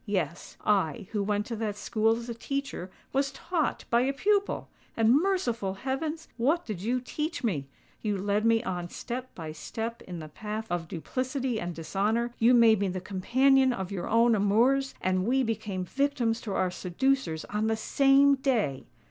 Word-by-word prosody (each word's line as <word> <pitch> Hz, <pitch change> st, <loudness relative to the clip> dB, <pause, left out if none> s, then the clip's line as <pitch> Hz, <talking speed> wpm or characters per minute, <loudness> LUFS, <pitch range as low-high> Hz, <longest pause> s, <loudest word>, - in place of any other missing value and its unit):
Yes—I, 190 Hz, +2 st, -1 dB
who 210 Hz, -, 0 dB
went 205 Hz, +1 st, 0 dB
to 230 Hz, -, -4 dB
that 215 Hz, -2 st, -2 dB
school 225 Hz, +1 st, +1 dB
as 235 Hz, 0 st, -7 dB
a 235 Hz, -, -3 dB
teacher, 275 Hz, -6 st, -4 dB, 0.2 s
was 275 Hz, +1 st, +2 dB
taught 330 Hz, +2 st, -2 dB
by 235 Hz, 0 st, +5 dB
a 270 Hz, +2 st, +1 dB
pupil! 405 Hz, +7 st, +1 dB, 0.3 s
And 225 Hz, +1 st, +5 dB
merciful 275 Hz, -, 0 dB
heavens! 300 Hz, +8 st, -3 dB
what 300 Hz, +9 st, +1 dB
did 205 Hz, -6 st, -5 dB
you 240 Hz, +5 st, 0 dB
teach 300 Hz, +5 st, -4 dB
me? 155 Hz, -, -1 dB, 0.3 s
You 210 Hz, -2 st, -1 dB
led 205 Hz, +2 st, 0 dB
me 230 Hz, 0 st, +3 dB
on 175 Hz, -4 st, -3 dB
step 250 Hz, +5 st, -5 dB
by 160 Hz, -3 st, -6 dB
step 225 Hz, +9 st, -5 dB
in 180 Hz, -1 st, -7 dB
the 155 Hz, -2 st, -7 dB
path 215 Hz, +7 st, -5 dB
of 175 Hz, -2 st, -2 dB
duplicity 255 Hz, -, -2 dB
and 175 Hz, -2 st, -4 dB
dishonour: 215 Hz, +8 st, -1 dB
you 240 Hz, +2 st, +6 dB
made 225 Hz, -3 st, +6 dB
me 200 Hz, -, +1 dB
the 185 Hz, 0 st, -3 dB
companion 260 Hz, +8 st, +3 dB
of 190 Hz, -5 st, -4 dB
your 190 Hz, -3 st, -4 dB
own 230 Hz, +1 st, +5 dB
amours; 235 Hz, +7 st, +3 dB
and 185 Hz, 0 st, +1 dB
we 265 Hz, +2 st, +3 dB
became 210 Hz, -5 st, -2 dB
victims 265 Hz, -1 st, 0 dB
to 205 Hz, -, -4 dB
our 185 Hz, -1 st, +1 dB
seducers 180 Hz, -1 st, 0 dB
on 210 Hz, +1 st, -1 dB
the 220 Hz, 0 st, +1 dB
same 275 Hz, +4 st, +5 dB
day!" 240 Hz, -, 0 dB
225 Hz, 175 wpm, -28 LUFS, 195-265 Hz, 0.3 s, you